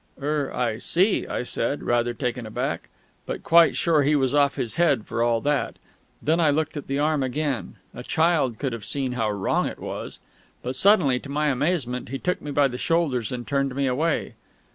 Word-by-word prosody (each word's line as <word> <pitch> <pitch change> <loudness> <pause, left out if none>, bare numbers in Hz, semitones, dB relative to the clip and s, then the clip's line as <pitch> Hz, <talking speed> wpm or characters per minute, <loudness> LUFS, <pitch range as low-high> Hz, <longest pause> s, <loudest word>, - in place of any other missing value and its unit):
"Er 145 0 -1
I 115 -3 -1
see," 190 - +1
I - - -2
said, 125 +3 -2
rather 120 0 +1
taken 125 -2 -3
aback 110 - -3 0.4
(but - - -4
quite 170 0 +5
sure 165 -3 +3
he 145 +2 +3
was 135 -2 +1
off 145 -1 +3
his 115 - -3
head 145 -10 +2
for 115 - -3
all 115 -1 +2
that). 145 +1 0 0.5
Then 160 +4 +2
I 160 -3 +4
looked 155 +2 0
at 145 - -6
the 135 - -1
arm 150 0 +1
again; 135 0 -2 0.2
a 125 - -7
child 155 -4 +1
could 135 -4 -2
have 115 -2 -6
seen 135 +1 -1
how 115 -3 -1
wrong 100 -2 0
it - - -6
was.... - - -6 0.5
But 125 +1 -3
suddenly, 150 -6 +4
to 140 - -11
my 150 +1 +1
amazement, 135 -3 -1
he 135 - -3
took 180 +6 -2
me 145 - -7
by 145 -1 +3
the 125 -1 -6
shoulders 145 -9 0
and 120 -1 -5
turned 140 -2 0
me 140 0 0
away. 145 +5 0
140 Hz, 205 wpm, -24 LUFS, 125-150 Hz, 0.5 s, quite